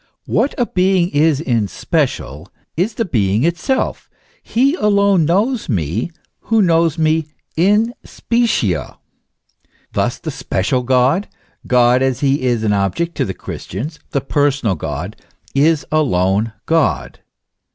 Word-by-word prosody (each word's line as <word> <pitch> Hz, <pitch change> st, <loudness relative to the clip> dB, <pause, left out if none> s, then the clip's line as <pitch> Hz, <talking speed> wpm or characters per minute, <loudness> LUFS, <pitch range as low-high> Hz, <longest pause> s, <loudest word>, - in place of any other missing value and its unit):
What 280 Hz, -, 0 dB
a 245 Hz, -, +2 dB
being 185 Hz, -3 st, +2 dB
is 150 Hz, -1 st, +2 dB
in 120 Hz, -8 st, 0 dB
special, -, -, -2 dB, 0.3 s
is 200 Hz, +7 st, -1 dB
the 230 Hz, -, -1 dB
being 105 Hz, -, +1 dB
itself; 170 Hz, -, -1 dB, 0.3 s
he 265 Hz, +5 st, +1 dB
alone 200 Hz, -, +3 dB
knows 210 Hz, -, 0 dB
me, 95 Hz, -, -1 dB, 0.3 s
who 225 Hz, 0 st, +1 dB
knows 165 Hz, -4 st, +3 dB
me 160 Hz, -1 st, +1 dB, 0.3 s
in 210 Hz, +7 st, +3 dB
specie. 230 Hz, -, 0 dB, 1.1 s
Thus -, -, 0 dB
the -, -, -5 dB
special 110 Hz, +7 st, -1 dB
God, 130 Hz, +9 st, +2 dB, 0.4 s
God 125 Hz, 0 st, +4 dB
as 130 Hz, -1 st, 0 dB
he 140 Hz, 0 st, +2 dB
is 120 Hz, -3 st, 0 dB
an 105 Hz, -2 st, +2 dB
object 100 Hz, -, -1 dB
to -, -, +1 dB
the 95 Hz, -, -5 dB
Christians, 145 Hz, -, -6 dB
the 140 Hz, -, -1 dB
personal 140 Hz, -6 st, +1 dB
God, 80 Hz, +4 st, -5 dB, 0.4 s
is 150 Hz, +1 st, +2 dB
alone 110 Hz, -7 st, +1 dB
God. 165 Hz, -3 st, 0 dB
145 Hz, 130 wpm, -18 LUFS, 115-180 Hz, 1.1 s, God